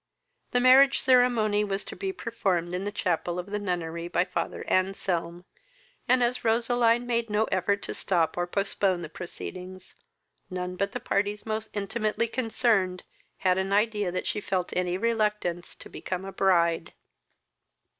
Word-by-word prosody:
The 245 Hz, -, +2 dB
marriage 265 Hz, +2 st, +6 dB
ceremony 240 Hz, -5 st, +3 dB
was 200 Hz, -1 st, -2 dB
to -, -, -9 dB
be 390 Hz, -1 st, -3 dB
performed 190 Hz, -, -2 dB
in 185 Hz, +2 st, -2 dB
the 205 Hz, -, -2 dB
chapel 175 Hz, -3 st, -1 dB
of 180 Hz, +3 st, -5 dB
the 210 Hz, -, -1 dB
nunnery 170 Hz, -3 st, -3 dB
by 175 Hz, +1 st, +1 dB
father 180 Hz, -, -4 dB
Anselm, 180 Hz, -2 st, -1 dB, 0.6 s
and, 250 Hz, 0 st, +4 dB
as 245 Hz, +1 st, 0 dB
Roseline 235 Hz, +1 st, +2 dB
made 235 Hz, -1 st, -1 dB
no 210 Hz, +1 st, +2 dB
effort 200 Hz, +2 st, +1 dB
to -, -, -4 dB
stop 170 Hz, -4 st, 0 dB
or 175 Hz, 0 st, -1 dB
postpone 195 Hz, -1 st, 0 dB
the 155 Hz, -, -6 dB
proceedings, 185 Hz, +2 st, -8 dB, 0.6 s
none 180 Hz, -1 st, -4 dB
but 200 Hz, +2 st, -2 dB
the -, -, -3 dB
parties 205 Hz, +1 st, -1 dB
most 220 Hz, 0 st, -3 dB
intimately 215 Hz, +2 st, -1 dB
concerned 225 Hz, -6 st, +1 dB, 0.4 s
had 185 Hz, 0 st, +4 dB
an 190 Hz, +1 st, -2 dB
idea 210 Hz, -2 st, +1 dB
that 185 Hz, -, -3 dB
she 210 Hz, -, -2 dB
felt 185 Hz, -3 st, -2 dB
any 180 Hz, 0 st, 0 dB
reluctance 210 Hz, -5 st, -1 dB
to -, -, -10 dB
become 185 Hz, 0 st, -5 dB
a 195 Hz, -, -6 dB
bride. 170 Hz, -4 st, +2 dB
200 Hz, 155 wpm, -27 LUFS, 180-225 Hz, 0.6 s, marriage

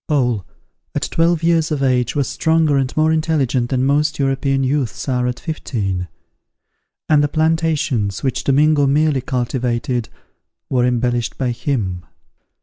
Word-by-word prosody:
Paul, 125 Hz, -, 0 dB, 0.5 s
at -, -, -1 dB
twelve 165 Hz, 0 st, +2 dB
years 165 Hz, -1 st, +2 dB
of 150 Hz, -3 st, -1 dB
age, 125 Hz, -1 st, +1 dB
was 140 Hz, -2 st, 0 dB
stronger 160 Hz, -2 st, +2 dB
and 135 Hz, -2 st, 0 dB
more 155 Hz, +1 st, +3 dB
intelligent 145 Hz, -6 st, 0 dB
than 130 Hz, -1 st, +1 dB
most 150 Hz, +2 st, +1 dB
European 135 Hz, 0 st, 0 dB
youths 130 Hz, -3 st, -1 dB
are 125 Hz, -2 st, 0 dB
at 125 Hz, -1 st, -3 dB
fifteen; 100 Hz, -, -3 dB, 1.0 s
and 150 Hz, -2 st, +4 dB
the -, -, +2 dB
plantations, 155 Hz, -, 0 dB
which 130 Hz, -3 st, -1 dB
Domingo 145 Hz, +1 st, +3 dB
merely 145 Hz, -1 st, +2 dB
cultivated, 125 Hz, -1 st, -2 dB, 0.6 s
were 125 Hz, -2 st, +2 dB
embellished 120 Hz, -1 st, -1 dB
by 130 Hz, -2 st, -1 dB
him. 105 Hz, -9 st, -2 dB
135 Hz, 140 wpm, -19 LUFS, 125-155 Hz, 1.0 s, and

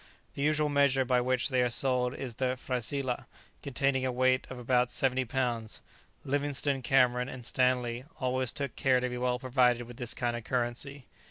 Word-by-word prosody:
The -, -, -6 dB
usual 150 Hz, +1 st, +2 dB
measure 140 Hz, -2 st, +2 dB
by 125 Hz, 0 st, +2 dB
which 130 Hz, +2 st, 0 dB
they 130 Hz, -2 st, +2 dB
are 125 Hz, -, +2 dB
sold 125 Hz, 0 st, +1 dB
is 130 Hz, -3 st, -5 dB
the 130 Hz, +2 st, -1 dB
frasilah, 130 Hz, +1 st, -2 dB, 0.3 s
containing 135 Hz, -1 st, 0 dB
a 130 Hz, -, 0 dB
weight 130 Hz, +1 st, +1 dB
of 130 Hz, -, -7 dB
about 125 Hz, 0 st, +1 dB
70 130 Hz, 0 st, +1 dB
lbs. 120 Hz, -3 st, -2 dB, 0.5 s
Livingstone, 140 Hz, 0 st, +2 dB
Cameron 125 Hz, -1 st, +2 dB
and 125 Hz, -2 st, -8 dB
Stanley 125 Hz, -1 st, +1 dB
always 130 Hz, -1 st, 0 dB
took 140 Hz, -4 st, -4 dB
care 130 Hz, -2 st, +3 dB
to 125 Hz, 0 st, -2 dB
be 125 Hz, 0 st, -5 dB
well 125 Hz, 0 st, 0 dB
provided 125 Hz, -1 st, +2 dB
with 120 Hz, 0 st, -12 dB
this 120 Hz, -2 st, -3 dB
kind 120 Hz, -1 st, -1 dB
of 120 Hz, -, -6 dB
currency. 125 Hz, +3 st, -2 dB
125 Hz, 180 wpm, -30 LUFS, 125-135 Hz, 0.5 s, care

